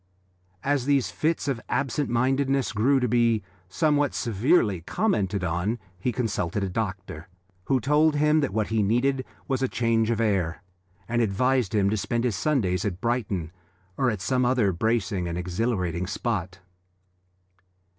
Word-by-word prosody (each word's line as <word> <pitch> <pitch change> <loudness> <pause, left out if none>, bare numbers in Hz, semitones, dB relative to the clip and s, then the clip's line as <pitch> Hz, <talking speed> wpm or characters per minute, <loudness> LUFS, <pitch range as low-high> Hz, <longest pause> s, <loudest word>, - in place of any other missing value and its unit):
As 140 -2 +1
these 140 -3 +2
fits 160 0 -1
of 130 -5 -1
absent 140 +1 -1
mindedness 135 +2 +1
grew 130 +6 +3
to 125 - +1
be 115 -2 +2 0.3
somewhat 145 - +1
severely 115 - +2
commented 100 - 0
on, 90 +7 -1 0.2
he 125 +7 0
consulted 110 -5 -2
a 95 - -1
doctor, 95 -5 -4 0.4
who 135 -1 +2
told 150 +4 +3
him 150 +1 +3
that 145 - 0
what 110 +1 -1
he 110 -1 +1
needed 125 +6 +1 0.2
was 135 -1 -1
change 115 -1 +1
of 115 -2 0
air, 95 -6 0 0.4
and 120 0 +1
advised 115 +2 +1
him 100 -2 +3
to 110 - 0
spend 115 +3 -1
his 120 -5 0
Sundays 95 - 0
at 90 -4 -3
Brighton 100 -9 -2 0.4
or 130 +3 +1
at 105 -5 -3
some 125 +5 +1
other 120 -5 +2
bracing 100 -2 0
and 85 0 -3
exhilarating 90 -1 -1
spot. 95 -5 -3
115 Hz, 150 wpm, -26 LUFS, 95-130 Hz, 0.4 s, grew